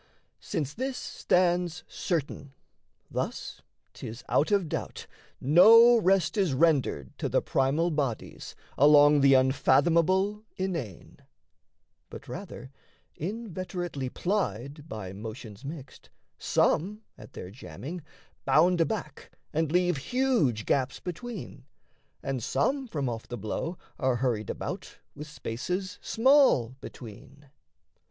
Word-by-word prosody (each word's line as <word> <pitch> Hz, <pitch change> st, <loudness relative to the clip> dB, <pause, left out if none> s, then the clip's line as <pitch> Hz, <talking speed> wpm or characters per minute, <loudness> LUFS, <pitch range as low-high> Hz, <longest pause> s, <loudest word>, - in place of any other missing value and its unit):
Since 145 Hz, -2 st, -3 dB
this 260 Hz, +2 st, -3 dB
stands 175 Hz, -1 st, 0 dB
certain, 145 Hz, -4 st, -3 dB, 0.6 s
thus -, -, -4 dB, 0.3 s
'tis 115 Hz, +3 st, -8 dB
out 150 Hz, -, +2 dB
of 200 Hz, -4 st, +2 dB
doubt -, -, -5 dB, 0.3 s
No 225 Hz, -, +7 dB
rest 195 Hz, -2 st, +2 dB
is 185 Hz, -9 st, +1 dB
rendered 135 Hz, -, +1 dB
to -, -, -2 dB
the -, -, +3 dB
primal 145 Hz, +6 st, +1 dB
bodies 140 Hz, -7 st, -4 dB, 0.2 s
Along 145 Hz, 0 st, +7 dB
the 135 Hz, 0 st, +6 dB
unfathomable 170 Hz, +10 st, +3 dB
inane; 165 Hz, -, -5 dB, 0.9 s
but 140 Hz, -, -10 dB
rather, 135 Hz, -3 st, -8 dB, 0.4 s
Inveterately 180 Hz, -, -4 dB
plied 150 Hz, -, -3 dB
by 95 Hz, -4 st, -6 dB
motions 110 Hz, +2 st, -9 dB
mixed, 140 Hz, -1 st, -9 dB, 0.3 s
Some, 210 Hz, +7 st, +1 dB
at -, -, -14 dB
their 90 Hz, -, -8 dB
jamming, 145 Hz, -, -8 dB, 0.4 s
bound 175 Hz, +2 st, +4 dB
aback 165 Hz, -5 st, -3 dB, 0.2 s
and 155 Hz, -1 st, 0 dB
leave 175 Hz, -2 st, +2 dB
Huge 215 Hz, -, 0 dB
gaps 135 Hz, -1 st, 0 dB
between, 200 Hz, +3 st, -7 dB, 0.6 s
and 135 Hz, -2 st, -2 dB
some 260 Hz, -, 0 dB
from 145 Hz, -, -3 dB
off 115 Hz, -2 st, -5 dB
the 120 Hz, -, -6 dB
blow 120 Hz, -, -4 dB, 0.2 s
Are 130 Hz, -2 st, +1 dB
hurried 120 Hz, -5 st, -1 dB
about -, -, -6 dB, 0.2 s
with 150 Hz, +1 st, -9 dB
spaces 180 Hz, -, -4 dB
small 260 Hz, -, +4 dB
between. 135 Hz, +5 st, -12 dB
155 Hz, 110 wpm, -28 LUFS, 130-185 Hz, 0.9 s, No